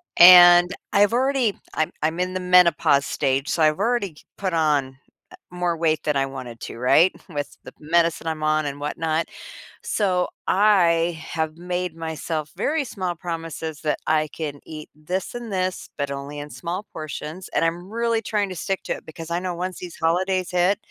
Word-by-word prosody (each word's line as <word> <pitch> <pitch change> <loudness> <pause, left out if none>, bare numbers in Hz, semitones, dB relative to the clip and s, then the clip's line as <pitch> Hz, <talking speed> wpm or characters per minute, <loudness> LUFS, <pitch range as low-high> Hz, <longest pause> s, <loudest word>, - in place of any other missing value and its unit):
And 175 0 +9 0.2
I've 205 0 +4
already 255 -3 +1 0.2
I'm 155 - 0
I'm 160 +2 0
in 185 +1 -1
the - - -1
menopause 180 -6 +4
stage, 135 0 -1
so 160 - +1
I've 155 +2 +3
already 230 -1 +1
c - - -17
put 190 -3 -2
on, 145 -5 +1 0.4
uh, - - -11
more 180 -1 -1
weight 160 -1 0
than 150 - 0
I 135 0 +1
wanted 130 -4 -8
to, - - -7
right, 145 +9 +4 0.2
with 145 -4 -5
the - - -11
medicine 165 +1 +1
I'm 155 -1 -3
on 155 0 +1
and 140 0 -5
whatnot. 160 +2 -1 0.6
So, 185 -4 0 0.2
I 175 -5 +3
have 160 0 -4
made 180 -1 -3
myself 160 -1 -4
very 305 0 0
small 185 -7 -4
promises 165 -2 -5
that 155 -2 0
I 155 -1 +2
can 145 -2 -6
eat 155 -1 -8
this 175 +8 -4
and 240 -2 -6
this, 185 -1 -2
but 140 -1 -2
only 140 +1 -6
in 145 0 -7
small 180 +4 -5
portions, 155 +3 -7
and - - +3
I'm 175 +3 -3
really 230 0 0
trying 205 -2 -1
to 185 - -6
stick 190 +4 -3
to - - -2
it - - -10
because 165 +1 -9
I 170 - 0
know 180 -1 -4
once 185 +1 -4
these 180 -2 -9
holidays 185 +3 0
hit, 180 +3 +2
170 Hz, 185 wpm, -23 LUFS, 155-185 Hz, 0.6 s, And